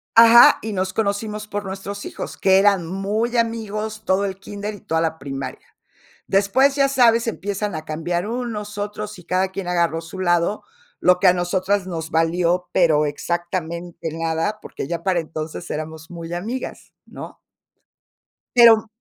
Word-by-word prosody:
Ajá, 230 +1 +9
y 220 -1 -4
nos 185 0 -2
conocimos 210 0 -2
por 205 0 -4
nuestros 195 +1 -6
hijos, - - -7
que 190 -1 +4
eran 195 -4 +3
muy 210 +6 -1
amigos, 220 -1 -2
todo 195 0 +1
el 190 -1 -4
kinder 205 +1 -6
y 205 - -11
toda 160 0 -1
la 160 -1 -1
primaria. 135 -1 -6 0.6
Después, 205 +8 +3
ya 275 -1 +3
sabes, 235 -4 +4
empiezan 205 -2 -3
a 155 0 -5
cambiar 175 +4 -2
unos, 220 -3 -4
otros 210 0 -5
y 180 - -13
cada 185 +2 +1
quien 190 -1 -6
agarró 170 -2 +1
su 165 +3 -10
lado, 175 +2 +1 0.4
lo 180 0 +4
que 190 - +4
a 180 - +7
nosotras 185 +2 0
nos 160 -2 -5
valió, 175 +2 +1
pero 155 -4 +4
exactamente 170 +1 -4
nada, 165 +6 -2
porque - - -7
ya 170 -1 -3
para 185 -3 +1
entonces 155 -1 -6
éramos 160 +2 -6
muy 170 -1 -7
amigas, 225 +9 -5
¿no? - - -10 1.2
Pero 230 -2 +7
190 Hz, 160 wpm, -21 LUFS, 170-210 Hz, 1.2 s, Ajá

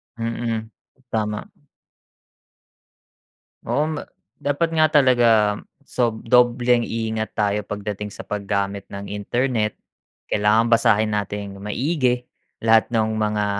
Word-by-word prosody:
Mm, 115 -1 -3 0.4
tama. 105 -1 -2 2.2
Oo 150 +2 0
nga. - - -6 0.3
Dapat 145 +4 0
nga 160 -1 +3 0.2
talaga, 125 -3 +4 0.5
sob 120 -5 -1
dobleng 120 0 +4
ingat 110 -1 -3
tayo 105 -1 0
pagdating 105 0 -5
sa - - -8
paggamit 100 -1 -2
ng 100 0 -7
internet, 110 +2 -1 0.6
kailangan 105 +3 +3
basahin 115 -2 +4
nating 100 -1 -4
maigi, 125 - 0 0.4
lahat 110 0 +5
no'ng 110 -1 +1
mga, 105 -1 0
110 Hz, 100 wpm, -22 LUFS, 105-120 Hz, 2.2 s, lahat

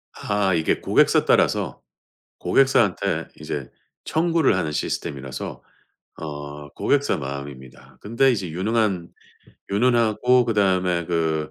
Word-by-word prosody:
아 105 -2 0
이게 80 -2 +1
고객사 - - +3
따라서 - - +1 0.6
고객사한테 125 -8 +2
이제 75 -4 -5 0.3
청구를 165 - +2
하는 80 -5 -1
시스템이라서 65 -3 -4 0.6
어 75 -1 -7
고객사 140 - 0
마음입니다. 65 -2 -8
근데 115 +5 +2
이제 95 -7 -3
유능한 95 0 -1 0.6
유능하고 120 +2 +3
그다음에 95 -6 +1
그 80 -3 -1
90 Hz, 270 characters per minute, -23 LUFS, 75-115 Hz, 0.6 s, 고객사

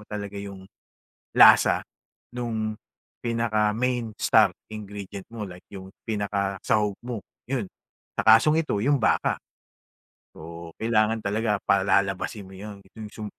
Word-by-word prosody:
mo - - -14
talaga 100 -1 -6
'yong 100 -1 -8 0.7
lasa - - +7 0.5
no'ng 110 -3 -2 0.5
pinaka 115 -3 +1
main 120 -2 -1
star 105 -5 +5 0.2
ingredient 100 -2 -8
mo 110 - -5
like 90 0 -12
'yong 95 -1 -9 0.2
pinaka 100 -2 -1
sahog 105 -2 +2
mo, 120 -4 -5 0.3
'yon. 125 -7 -1 0.5
Sa - - +3
kasong 150 +9 +6
ito 105 - -2
'yong 140 +4 +3
baka. - - +2 1.0
Oo, 85 +1 -9
kailangan 110 0 +2
talaga 105 0 0
palalabasin 100 +1 +1
mo 95 - -13
'yon, 105 +1 -8 0.2
'yong 110 -2 -8
sum 110 -1 -7
105 Hz, 130 wpm, -25 LUFS, 100-115 Hz, 1.0 s, lasa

